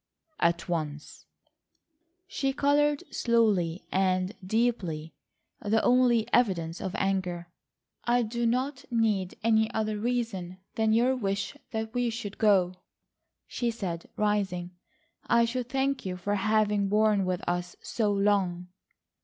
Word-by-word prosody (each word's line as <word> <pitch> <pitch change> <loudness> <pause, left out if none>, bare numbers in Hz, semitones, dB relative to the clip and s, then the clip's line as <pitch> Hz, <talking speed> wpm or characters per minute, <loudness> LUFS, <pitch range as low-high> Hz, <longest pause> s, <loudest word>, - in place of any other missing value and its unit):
"At 170 0 +1
once." 155 -4 -4 1.0
She 270 -7 -1
coloured 290 +1 +2
slowly 205 -8 +1
and 185 0 +1
deeply,—the 205 0 -2
only 245 -3 +4
evidence 175 -8 +1
of 190 - -4
anger. 180 -3 -1 0.6
"I 245 0 +3
do 235 +1 -1
not 260 +3 -1
need 215 -6 0
any 220 -1 +3
other 215 -1 -1
reason 220 -6 -2 0.2
than 220 -1 +1
your 245 +3 +3
wish 205 +1 -2
that 220 0 -4
we 245 -1 +1
should 220 -3 -6
go," 185 -4 +3 0.7
she 240 - -2
said, 185 -7 -4
rising. 195 -4 0 0.6
"I 235 0 +4
should 245 +1 -3
thank 270 0 0
you 185 -1 -4
for 200 +3 -2
having 205 0 +2
borne 210 -1 +3
with 185 -1 -2
us 175 0 -2
so 215 -3 0
long." 195 -3 +1
210 Hz, 120 wpm, -28 LUFS, 185-235 Hz, 1.0 s, only